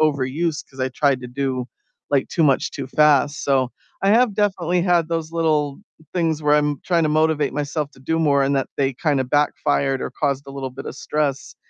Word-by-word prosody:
overuse 150 +2 0
'cause 135 - -12
I 130 - +1
tried 135 0 +1
to 125 - -7
do, 130 -1 -2 0.4
like, 140 -2 +1
too 165 - 0
much 140 -4 +2
too 135 - -6
fast 145 +1 +3
so, 130 -3 +2 0.3
I 195 - +3
have 230 0 +4
definitely 180 -4 +1
had 175 -3 +2
those 165 -1 -3
little 155 -4 0 0.4
things 165 -3 0
where 150 0 +4
I'm 150 -1 +1
tryna 165 -4 +2
motivate 155 -1 +2
myself 145 0 -2
to - - -19
do 160 +5 -1
more 145 -3 +3
and 135 +1 +1
that 135 - -1
they 135 -1 +1
kinda 140 -1 0
backfired 140 0 +1
or - - -3
caused 140 -2 -2
a - - -8
little 135 -1 -4
bit 135 +2 -9
of - - -6
stress, 145 -3 -2
145 Hz, 200 wpm, -21 LUFS, 135-160 Hz, 0.4 s, have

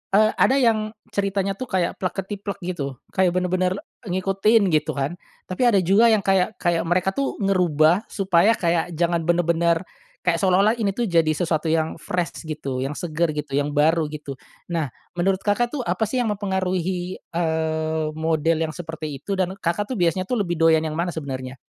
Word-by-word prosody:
eee, 215 +1 +5
ada 265 - +5
yang 220 -4 +2 0.2
ceritanya, 195 0 -1
tuh, 255 - -4
kayak 185 -3 -1
plek 185 - -2
ketiplek 200 0 -5
gitu, 145 -7 -4 0.2
kayak 185 -2 +2
benar-benar 185 0 +1 0.3
ngikutin, 195 +2 +2
gitu, 155 -2 +1
kan. 145 +6 -2 0.2
Tapi 185 - -6
ada 205 -4 +4
juga 200 +7 +5
yang 220 -4 +3
kayak 195 +2 +2
kayak 170 -2 0
mereka, 180 +2 +2
tuh, 275 +7 -2
ngerubah 180 0 +3
supaya 195 +2 +3
kayak 170 -1 0
jangan 170 0 0
benar-benar, 170 0 +2 0.4
kayak 170 -2 +1
seolah-olah 195 +2 +4
ini, 200 -3 0
tuh, 240 - -1
jadi 165 -6 +2
sesuatu 160 -1 -1
yang 160 0 0
fresh 175 -1 -3
gitu, 140 -4 -4
yang 135 +3 -3
seger 165 -2 -1
gitu, 150 -1 -5
yang 145 +1 -2
baru 155 +2 +3
gitu. 150 -3 -7 0.3
Nah, 165 -4 0 0.3
menurut 190 +1 +2
Kakak, 210 +4 +2
tuh, 260 - -2
apa, 220 - 0
sih, 240 - -4
yang 220 - 0
mempengaruhi, 185 -2 -2
eee, 160 -1 -1
model 160 0 +1
yang 155 - -7
seperti 155 -4 -6
itu 195 +8 -3
dan 185 -1 0
Kakak, 190 +7 -1
tuh, - - -1
biasanya, 175 +2 +2
tuh, 235 +5 -2
lebih 175 -4 -1
doyan 165 0 +4
yang 155 -1 -3
mana 170 +2 -1
sebenarnya? 135 -4 -6
175 Hz, 180 wpm, -23 LUFS, 160-195 Hz, 0.4 s, eee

